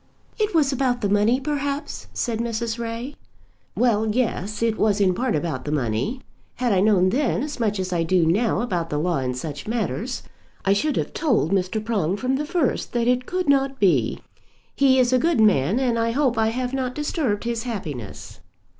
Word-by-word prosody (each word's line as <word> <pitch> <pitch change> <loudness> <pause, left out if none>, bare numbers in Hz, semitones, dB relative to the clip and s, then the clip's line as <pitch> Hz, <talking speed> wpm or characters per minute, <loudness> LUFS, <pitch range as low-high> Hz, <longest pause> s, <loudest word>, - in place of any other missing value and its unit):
"It 425 -3 0
was 290 -4 +3
about 255 -2 0
the 205 - 0
money, 210 +5 +3
perhaps?" 285 +1 -3
said 230 -3 -2
Mrs. 235 0 -2
Ray. 235 +4 -4 0.6
"Well, 220 -3 +2
yes; 215 -2 -1
it 225 -2 0
was 210 -1 +2
in 190 -2 +3
part 245 +3 0
about 150 -4 -2
the 150 - -4
money. 135 - -1 0.3
Had 245 -3 0
I 190 - +3
known 190 -2 +4
then 255 +2 0
as 295 -3 -5
much 210 -3 0
as 185 -1 -2
I 170 - +1
do 165 +1 +2
now 210 +8 +2
about 175 -9 -2
the 150 - -1
law 170 0 0
in 125 -1 -2
such 145 +4 -6
matters, 235 +2 -2 0.4
I 195 - +4
should 290 +9 0
have - - -2
told 245 - +1
Mr. 195 +3 0
Prong 200 -5 0
from 255 +4 0
the 300 - -2
first 340 -6 -1
that 240 -1 +1
it 250 0 +1
could 365 -1 -2
not 275 -1 +2
be. 195 -4 +2 0.6
He 270 -1 +4
is 255 -1 +3
a 255 - +4
good 330 -2 +1
man, 200 - +3
and 245 -3 +1
I 230 0 +1
hope 265 -2 +2
I 220 -1 +2
have 250 +3 -2
not 255 -2 -2
disturbed 295 - -1
his 235 -1 -2
happiness." 150 - -6
230 Hz, 200 wpm, -23 LUFS, 190-255 Hz, 0.6 s, known